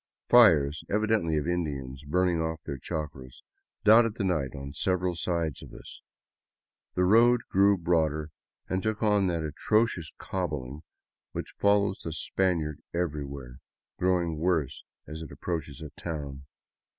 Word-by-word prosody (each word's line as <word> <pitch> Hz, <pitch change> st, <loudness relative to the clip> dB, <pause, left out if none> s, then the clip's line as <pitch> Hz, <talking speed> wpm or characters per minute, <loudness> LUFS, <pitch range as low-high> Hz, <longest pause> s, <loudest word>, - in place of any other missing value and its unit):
Fires, 80 Hz, -11 st, +6 dB
evidently 105 Hz, -6 st, +1 dB
of 75 Hz, -, -1 dB
Indians 70 Hz, -6 st, -3 dB
burning 90 Hz, +1 st, +2 dB
off 80 Hz, 0 st, -3 dB
their 70 Hz, -3 st, -5 dB
chacras, 70 Hz, -4 st, -6 dB, 0.4 s
dotted 115 Hz, 0 st, +6 dB
the 100 Hz, -, -2 dB
night 75 Hz, -8 st, -1 dB
on 70 Hz, 0 st, -7 dB
several 90 Hz, +1 st, 0 dB
sides 85 Hz, -4 st, -2 dB
of -, -, -11 dB
us. -, -, -12 dB, 0.9 s
The 90 Hz, -, +2 dB
road 115 Hz, +5 st, +5 dB
grew 100 Hz, +1 st, +5 dB
broader 80 Hz, -3 st, 0 dB, 0.4 s
and 95 Hz, 0 st, -1 dB
took 110 Hz, +1 st, -2 dB
on 105 Hz, -2 st, +3 dB
that 85 Hz, -2 st, -1 dB
atrocious 90 Hz, +1 st, 0 dB
cobbling 75 Hz, -7 st, -4 dB, 0.5 s
which -, -, -5 dB
follows 100 Hz, -1 st, +2 dB
the 80 Hz, -, -4 dB
Spaniard 80 Hz, -3 st, -1 dB
everywhere, 70 Hz, -7 st, -4 dB, 0.4 s
growing 90 Hz, -3 st, +1 dB
worse 80 Hz, -5 st, 0 dB, 0.2 s
as 80 Hz, +1 st, -8 dB
it 80 Hz, -, -8 dB
approaches 80 Hz, -4 st, -5 dB
a 75 Hz, -, -8 dB
town. 70 Hz, -4 st, -6 dB
85 Hz, 135 wpm, -28 LUFS, 75-95 Hz, 0.9 s, Fires